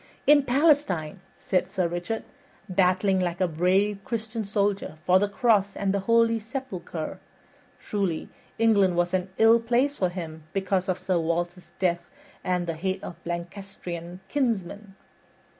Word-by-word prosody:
"In 295 0 +7
Palestine," 265 - +2 0.2
said 185 -1 0
Sir 185 -2 0
Richard, 175 +6 -3 0.4
"battling 185 +1 +2
like 175 -1 -1
a 185 - +3
brave 185 +5 +1
Christian 225 -2 -3
soldier 200 -4 -1
for 185 +1 +5
the 205 +1 +1
cross 205 -3 +2
and 195 -1 0
the 200 - +1
holy 230 0 +4
sepulcher. 210 - -6 0.6
Truly, 195 -6 -2 0.3
England 205 -5 +4
was 175 +1 +1
an 185 0 0
ill 225 +1 +6
place 245 +5 +1
for 185 - +2
him 160 -3 -7
because 190 -1 0
of 185 - +1
Sir 185 -1 0
Walter's 175 +2 -2
death 175 -2 0 0.3
and 180 -1 0
the 165 - -2
hate 185 +4 -3
of - - -6
the - - -7
Lancastrian's 175 0 -6
kinsmen." 205 -6 -2
190 Hz, 145 wpm, -26 LUFS, 175-220 Hz, 0.6 s, In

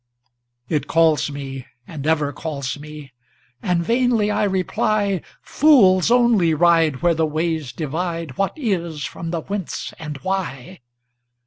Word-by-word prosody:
It 150 0 -1
calls 160 -2 +3
me 135 -2 -7 0.2
and 150 0 -6
ever 150 -3 +1
calls 140 -3 -4
me! 150 -3 -11 0.5
And 175 -1 0
vainly 235 -2 +2
I 210 - +1
reply,"Fools 200 - +2
only 235 -9 +4
ride 165 -4 +3
where 175 -1 +4
the 160 -1 +1
ways 155 -3 -2
divideWhat 165 - -3
Is 170 - -2
from 165 - -6
the 165 -1 -2
Whence 195 0 -5
and 150 -3 -6
Why"! 185 -4 -4
165 Hz, 120 wpm, -21 LUFS, 150-190 Hz, 0.5 s, only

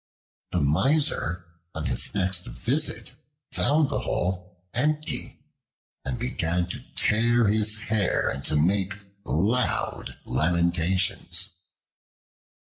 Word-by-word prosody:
The 90 - 0
Miser, 90 - +1 0.3
on - - -4
his - - +1
next 95 -2 0
visit, 135 +1 0 0.4
found 150 0 +2
the 140 - -1
hole 90 0 -3
empty 150 +4 -2 0.6
and 125 - -3
began 90 -8 -1
to - - -5 0.2
tear 115 +1 +3
his 110 +1 +4
hair 110 -4 +1
and 70 - -3
to - - -1
make 95 +5 +2 0.3
loud 95 - -1
lamentations. 85 +2 +1
95 Hz, 100 wpm, -26 LUFS, 85-120 Hz, 0.6 s, his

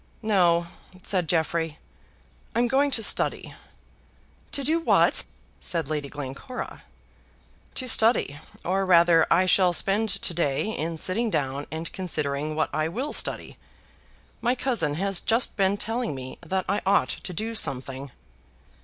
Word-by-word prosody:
"No," 175 -5 +3 0.4
said 180 -5 0
Jeffrey; 165 -1 0 0.8
"I'm 240 +1 +3
going 275 +3 +2
to 230 -5 +2
study." - - +1 1.0
"To 280 - -1
do 315 +5 +2
what?" 330 - +4 0.4
said 165 -4 -2
Lady 145 -2 -2
Glencora. 145 - -7 0.9
"To 255 - -1
study; 225 - +4 0.3
or 190 +2 +1
rather 170 -3 +5
I 180 +2 +4
shall 185 -1 +4
spend 205 +5 +1
to 180 - -2
day 165 +2 0
in 165 +2 -3
sitting 220 +8 -1
down 140 -5 -2
and 160 +1 -6
considering 150 -4 -2
what 155 - -1
I 155 0 0
will 255 - -4
study. - - -3 0.8
My 245 +2 +2
cousin 230 - 0
has 195 +2 -2
just 230 +2 +1
been 195 -1 +2
telling 225 - -2
me 130 0 -8
that 185 +2 -2
I 200 +2 0
ought 200 +1 +3
to - - -5
do 220 +6 -3
something." 135 - -2
180 Hz, 140 wpm, -26 LUFS, 155-220 Hz, 1.0 s, rather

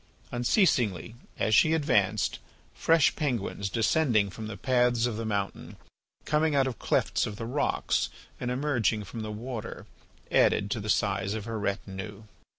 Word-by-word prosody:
Unceasingly, 120 - +1 0.2
as 110 - +1
she 155 +9 +5
advanced, 135 -12 +1 0.3
fresh 165 -3 +3
penguins, 115 -8 -2
descending 115 -2 +2
from 110 +2 -7
the 110 -2 -6
paths 125 -2 +2
of 120 -3 -1
the 115 +1 -4
mountain, 100 -2 -3 0.5
coming 155 0 +2
out 135 -1 +4
of 130 -5 -4
clefts - - +1
of 105 - -6
the 115 - -6
rocks, 130 +5 0 0.3
and 125 - -3
emerging 125 -5 0
from 115 +3 -8
the 110 -1 -4
water, 115 +1 -6 0.5
added 100 - +3
to 110 - -1
the 105 0 -5
size 100 -1 +1
of 110 -2 -5
her 115 -1 -4
retinue. 100 +1 -4
115 Hz, 155 wpm, -28 LUFS, 105-130 Hz, 0.5 s, she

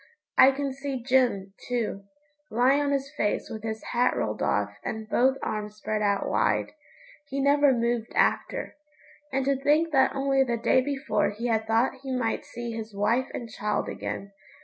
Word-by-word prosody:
I 260 - +8
can 275 0 -2
see 270 -2 -5
Jim, 245 -7 +2
too 225 -5 -2 0.4
lying 255 +5 +3
on 285 -1 0
his 275 0 -1
face 210 - -1
with 220 - -6
his 220 0 -4
hat 245 +1 +2
rolled - - -2
off - - 0
and 220 -1 -4
both 265 +4 +3
arms 210 -1 -3
spread 215 0 -3
out 200 -1 +1
wide. - - +1 0.6
He 275 0 -3
never 285 +1 +4
moved 235 -2 0
after. - - +1 0.6
And 270 0 0
to 275 0 +2
think 305 +4 +3
that 270 -2 +3
only 270 0 +2
the 240 -2 -1
day 235 +2 +3
before 270 -5 0
he 215 +3 -6
had 220 -1 0
thought 230 +4 +1
he 270 -1 -5
might 245 -3 -1
see 240 0 -6
his 220 -2 -6
wife 225 +6 +1
and 235 - -5
child 210 -1 -2
again! 200 0 -5
245 Hz, 175 wpm, -27 LUFS, 220-270 Hz, 0.6 s, I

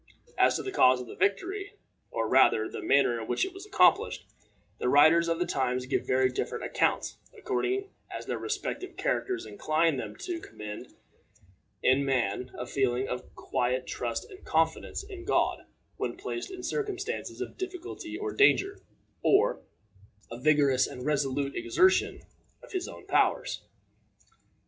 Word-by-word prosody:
As - - +4
to - - -2
the 390 - -4
cause 130 - +5
of 125 - -6
the - - -10
victory, 380 - -1 0.3
or, - - -1
rather, 435 -3 +4
the 425 +3 -7
manner 140 - +3
in 110 - -7
which - - +1
it 380 - -7
was 385 +2 -10
accomplished, 420 0 +3 0.5
the 125 - 0
writers 155 +5 +6
of 165 0 +1
the 175 - 0
times 125 -3 -1
give 130 - -1
very 130 0 +3
different - - -3
accounts, - - 0 0.2
according 395 -1 -1 0.2
as - - -6
their - - -3
respective 375 - -4
characters 385 -7 -1
incline 160 -4 +1
them 110 -4 -5
to 350 -2 -3
commend, 105 - -9 0.9
in 130 +2 +4
man, 125 -3 0
a 125 - -4
feeling 130 0 0
of 125 0 -6
quiet 125 +1 -1
trust 120 -2 -3
and 380 - -13
confidence 160 - 0
in 390 -3 -9
God - - +1 0.3
when - - -3
placed 360 - -5
in 370 -1 -8
circumstances 415 +1 -3
of - - -5
difficulty 365 -3 -6
or 420 +2 -3
danger, 400 -1 +4 0.4
or 450 +5 +3 0.7
a 115 - -6
vigorous 140 -2 +4
and 125 - -8
resolute 140 -1 0
exertion 350 +2 +2 0.4
of - - -13
his 370 -2 -2
own - - -10
powers. - - +1
170 Hz, 155 wpm, -29 LUFS, -, 0.9 s, writers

